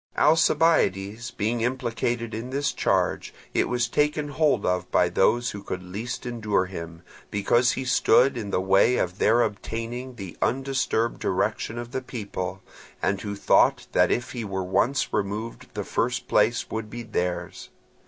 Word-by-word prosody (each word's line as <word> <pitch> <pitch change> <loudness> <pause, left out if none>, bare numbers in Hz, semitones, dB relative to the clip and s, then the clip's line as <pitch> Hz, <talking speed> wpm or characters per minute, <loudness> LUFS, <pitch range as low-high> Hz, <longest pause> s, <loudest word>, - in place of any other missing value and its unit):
Alcibiades 120 - +3
being 115 +2 -1
implicated 120 -1 -1
in 115 +3 -5
this 140 +2 0
charge, - - 0 0.2
it - - +1
was 120 -1 +1
taken 150 0 0
hold 145 -6 +2
of 90 0 0
by 90 - +3
those 115 +5 +2
who 100 - -7
could 95 -2 -5
least 105 +9 -5
endure 105 -6 0
him, 85 -2 -8 0.3
because 120 +5 +2
he 130 - -4
stood 130 +1 +4
in 110 -4 -4
the 100 - +1
way 95 +6 +4
of 90 +2 -2
their 120 +2 +4
obtaining 115 +4 -4
the 95 -6 -8
undisturbed 130 -3 0
direction 105 +4 -1
of 120 0 -6
the 130 - -2
people, 95 -6 -5 0.4
and 100 0 0
who 100 -1 -4
thought 100 - +3
that - - +4
if 120 - -1
he 120 -3 -4
were 95 -2 -3
once 100 +9 +1
removed 105 +3 -3
the - - -2
first - - -1
place - - +2
would 110 -1 -4
be 120 +2 -6
theirs. 90 -5 -3
115 Hz, 160 wpm, -25 LUFS, 100-125 Hz, 0.4 s, stood